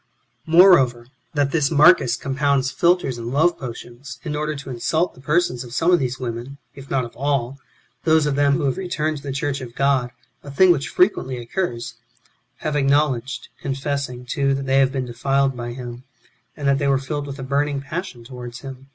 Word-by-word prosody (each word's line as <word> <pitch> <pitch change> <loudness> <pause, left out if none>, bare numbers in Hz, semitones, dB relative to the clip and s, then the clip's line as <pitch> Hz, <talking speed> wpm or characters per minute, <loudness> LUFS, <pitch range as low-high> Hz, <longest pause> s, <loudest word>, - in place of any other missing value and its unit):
5. 160 - -5
Moreover, 135 -10 +6 0.3
that 140 -1 +1
this 150 -3 +2
Marcus 150 -5 +5
compounds 135 0 0
philters 170 -8 +1
and 115 - -6
love 160 +6 +2
potions, 125 0 -8
in 150 -2 -3
order 150 0 -2
to 140 -1 -8
insult 160 +8 0
the 130 - -16
persons 150 -3 0
of 120 0 -9
some 165 +5 +3
of 175 - +5
these 130 -1 -2
women, 125 +2 -5 0.2
if 135 -1 -12
not 130 -2 0
of 120 - -12
all, 135 -1 -1 0.4
those 160 -1 +4
of 145 - +1
them 140 0 +3
who 150 +2 0
have 135 -2 0
returned 155 -5 -2
to - - -9
the 140 0 -5
church 140 0 -2
of 120 -2 -9
God 135 -3 +2 0.2
— - - -44
a 145 - -9
thing 180 +6 +5
which 145 -5 0
frequently 155 -9 +1
occurs— 120 -1 -3 0.7
have 155 - -2
acknow 145 +1 +3
ledged, 130 +2 -6
confessing, 135 -2 -3
too, 135 +2 0
that 135 0 -4
they 135 0 +3
have 135 -1 +3
been 135 -2 -2
defiled 135 +3 0
by 120 -1 -5
him, 120 -1 -8 0.5
and 145 -2 -2
that 140 0 +3
they 140 - 0
were 135 -1 +3
filled 145 +2 -4
with 140 0 -6
a 135 - -6
burning 140 +1 0
passion 140 -2 -6
towards 120 -1 -9
him. 135 0 -10
135 Hz, 205 wpm, -22 LUFS, 125-150 Hz, 0.7 s, Moreover